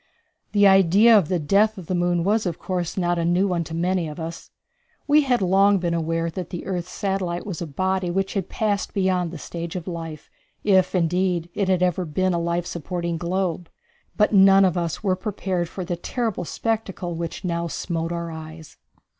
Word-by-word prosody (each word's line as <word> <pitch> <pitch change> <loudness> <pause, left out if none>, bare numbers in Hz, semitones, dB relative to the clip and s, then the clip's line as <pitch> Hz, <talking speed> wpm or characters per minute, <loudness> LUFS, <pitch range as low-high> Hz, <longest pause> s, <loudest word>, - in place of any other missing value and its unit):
The 205 -1 +5
idea 195 +4 +6
of 195 -7 +4
the 180 - 0
death 200 +8 +2
of 185 - -8
the 185 - -3
moon 175 -1 +1
was, 210 +2 +1
of 170 - -3
course, 180 -2 -3
not 175 -1 +1
a - - 0
new 175 +4 +2
one 175 -3 0
to 165 - -6
many 175 0 0
of 150 +2 -8
us. 165 +1 -7 0.6
We 300 +1 +5
had 250 -7 +1
long 195 +2 +4
been 175 -2 -1
aware 165 0 -1
that 180 +1 -6
the 175 - -6
earth's 180 -2 -3
satellite 190 -3 -2
was 190 -5 -5
a 170 - -3
body 185 +4 -1
which 195 +2 -1
had 195 -3 -2
passed 210 -2 -1
beyond 185 -3 +1
the 170 - -7
stage 170 +2 -6
of 180 -1 -5
life, 165 -3 -7 0.3
if 190 -2 +3
indeed 175 0 +1
it 200 - -1
had 185 -1 +2
ever 180 0 +1
been 185 +3 0
a 170 - 0
life 170 +1 -1
supporting 170 0 -3
globe; 175 -1 -2 0.5
but 210 0 +3
none 195 0 +7
of 185 -2 +1
us 170 0 -2
were 190 -3 +2
prepared 185 -3 -3
for 185 0 -6
the 175 0 -2
terrible 225 0 -3
spectacle 200 -4 -3
which 170 +3 -5
now 170 -1 -1
smote 165 0 -3
our 170 -1 -4
eyes. 160 0 -10
180 Hz, 200 wpm, -23 LUFS, 170-195 Hz, 0.6 s, none